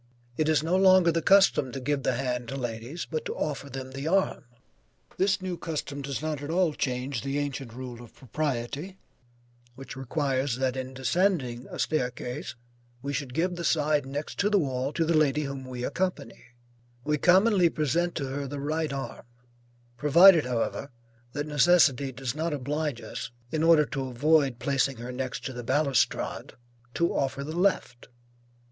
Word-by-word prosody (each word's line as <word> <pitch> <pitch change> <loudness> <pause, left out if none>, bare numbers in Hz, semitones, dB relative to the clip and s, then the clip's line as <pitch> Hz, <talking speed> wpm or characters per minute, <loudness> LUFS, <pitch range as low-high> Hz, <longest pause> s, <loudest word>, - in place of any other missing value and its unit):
It 155 +2 +1
is 155 -1 +3
no 165 +3 +1
longer 185 -2 +6
the 165 0 0
custom 195 -8 +4
to 135 - -4
give 140 +2 -1
the 130 - 0
hand 125 -2 -2
to 135 - -5
ladies, 120 +5 -5
but 155 -1 -3
to - - -4
offer 140 -2 -3
them 130 0 -7
the 135 +3 -5
arm. 190 -4 +1 0.7
This 190 0 +1
new 180 -2 -3
custom 145 -3 -4
does 140 +1 -4
not 155 -2 -2
at 145 - -6
all 170 -1 +2
change 125 -2 -2
the 140 +1 -2
ancient 140 -4 -3
rule 125 0 -8
of 120 - -14
propriety 145 - -3 0.8
which 135 0 -9
requires 135 -1 -1
that 130 0 -1
in 130 0 -5
descending 130 -3 0
a - - -7
staircase, 125 -2 -2 0.5
we 140 0 -3
should 135 -3 -4
give 180 +2 0
the 170 - -4
side 150 -3 +1
next 145 +3 -4
the 205 0 +3
wall 135 -5 -1
to 165 +1 0
the 165 - +1
lady 150 -1 +3
whom 135 -1 -5
we 125 -1 -6
accompany; 180 -11 -3 0.6
we 150 0 0
commonly 185 +1 +5
present 165 +3 0
to 145 - -2
her 140 +1 -4
the 145 +1 -5
right 155 +1 -1
arm, 135 -3 -6 0.7
provided 165 +4 +7
however, 125 +3 -2 0.4
that 145 0 -2
necessity 150 -3 +4
does 130 -1 -4
not 160 +2 -2
oblige 145 -1 -2
us, - - -6 0.2
in 155 - -1
order 165 -2 +6
to 135 -2 -4
avoid 135 0 +2
placing 135 0 0
her 120 +2 -6
next 130 0 -4
the 125 -2 -5
balustrade, 140 +2 0 0.4
to 170 - +1
offer 140 0 -1
the 155 +3 -6
left. 175 -9 0
140 Hz, 170 wpm, -27 LUFS, 130-160 Hz, 0.8 s, provided